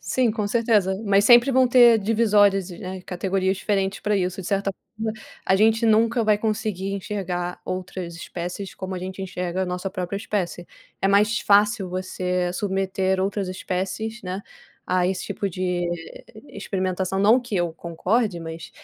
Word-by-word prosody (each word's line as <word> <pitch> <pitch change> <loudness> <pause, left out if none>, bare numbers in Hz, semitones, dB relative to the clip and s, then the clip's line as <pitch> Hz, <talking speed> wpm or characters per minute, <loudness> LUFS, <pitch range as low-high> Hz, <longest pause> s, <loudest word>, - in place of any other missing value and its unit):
Sim, 225 - +1
com 210 -2 -2
certeza, 210 -4 +2
mas 200 0 +4
sempre 240 +3 +7
vão 260 -1 +4
ter 240 -2 +7
divisórias 205 -3 +3
e, 175 - -9
né, 185 0 -6
categorias 190 +1 -1
diferentes 195 -1 -1
pra 210 -1 +1
isso. 185 +1 -1
De 180 - -7
certa 200 -1 0 0.2
forma, 220 0 -2 0.3
a 190 - +3
gente 225 +2 +3
nunca 225 +2 +3
vai 210 -1 +3
conseguir 210 -3 -2
enxergar 185 -3 -4
outras 185 -1 -5
espécies 180 +3 -6
como 190 0 -5
a 185 - -3
gente 190 +1 -6
enxerga 180 -1 -3
a - - -2
nossa 180 +1 -3
própria 185 0 -4
espécie. 190 -4 -3 0.3
É 195 - +2
mais 210 +2 +3
fácil 205 -1 +3
você 180 -1 -2
submeter 190 0 0
outras 195 0 -1
espécies, 195 +5 -4
né, 185 +1 -4 0.5
a 180 0 +2
esse 185 -1 -2
tipo 200 - -3
de 180 0 -1 0.6
experimentação, 190 -1 -2
não 220 +6 +5
que 235 -5 -4
eu 175 -2 0
concorde, 180 +5 -1
mas 165 0 -8
195 Hz, 160 wpm, -23 LUFS, 185-210 Hz, 0.6 s, sempre